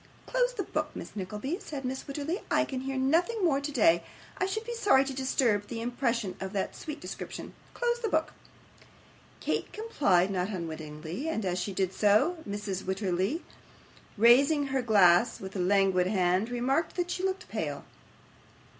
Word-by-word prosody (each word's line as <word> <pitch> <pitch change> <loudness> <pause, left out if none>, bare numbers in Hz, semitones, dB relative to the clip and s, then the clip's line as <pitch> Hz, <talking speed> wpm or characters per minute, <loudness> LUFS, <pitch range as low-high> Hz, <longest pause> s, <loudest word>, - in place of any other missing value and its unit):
'Close - - +1
the 400 - -2
book, 305 -3 -2
Miss - - -8
Nickleby,' 210 - -4
said 285 -8 -6
Mrs. 260 +1 -4
Wititterly. 295 +7 -3
'I - - +3
can 260 -2 -4
hear 270 0 -3
nothing 340 - +2
more 280 -4 +2
today; 215 - +3 0.4
I 375 - +1
should 435 +3 -2
be 475 - -4
sorry 405 - +4
to 270 - -4
disturb 245 -6 +1
the 230 - -5
impression 235 -4 -1
of 190 +1 -4
that 195 -2 -2
sweet 305 -1 -6
description. - - -7 0.2
Close 475 -1 0
the 455 -2 -1
book.' 315 -3 0 1.1
Kate - - -1
complied, 200 - +2
not 185 0 -1
unwillingly; 160 - -5
and, 220 -10 -2
as 180 0 0
she 180 +3 -2
did 190 -1 0
so, 215 - +3
Mrs. 200 -2 -3
Wititterly 190 - -1 0.7
raising 275 +7 +5
her 265 - +2
glass 200 -3 +5
with 190 0 -8
a - - -2
languid 190 -1 +3
hand, 185 +2 +1
remarked, 265 +6 0
that 355 -1 -1
she 360 - -2
looked 380 0 -2
pale. - - -3
245 Hz, 165 wpm, -29 LUFS, 190-310 Hz, 1.1 s, raising